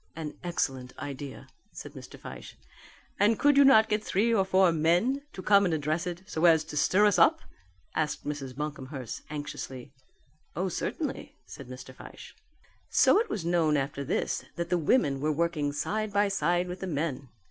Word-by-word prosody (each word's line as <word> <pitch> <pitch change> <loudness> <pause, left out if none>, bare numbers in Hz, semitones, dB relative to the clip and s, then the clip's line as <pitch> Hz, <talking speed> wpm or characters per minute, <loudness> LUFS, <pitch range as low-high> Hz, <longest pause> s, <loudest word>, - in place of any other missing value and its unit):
"An 155 -2 -5
excellent 135 -7 -3
idea," 140 -1 -7 0.3
said - - -9
Mr. - - -11
Fyshe. - - -10 0.6
"And 210 +2 +4
could 290 0 +4
you 280 - +7
not 240 -5 +6
get 210 0 0
three 220 +5 +1
or 200 -4 +3
four 190 -1 +4
men 175 - +2
to 185 - -8
come 200 0 +5
and 175 -4 +1
address 155 +3 -1
it 175 +1 -5
so 165 -3 -1
as 160 -2 +6
to 150 - -9
stir 190 +7 +3
us 205 - +3
up?" - - +5 0.5
asked 150 -2 -2
Mrs. 140 -3 -5
Buncomhearst 140 -4 -6
anxiously. 145 -3 -6 0.6
"Oh, 185 +4 -1
certainly," - - -4
said - - -10
Mr. 125 0 -9
Fyshe. - - -12 0.6
So - - +5
it 460 - -1
was 175 - -3
known 165 -3 +2
after 140 0 -3
this 140 - -1
that 170 0 -4
the 180 - +3
women 145 - +2
were 155 +3 0
working 155 -2 0
side 210 +9 -2
by 205 0 +2
side 175 -1 +1
with 180 +1 -6
the 190 - -4
men. 145 -5 -3
165 Hz, 180 wpm, -28 LUFS, 145-190 Hz, 0.6 s, you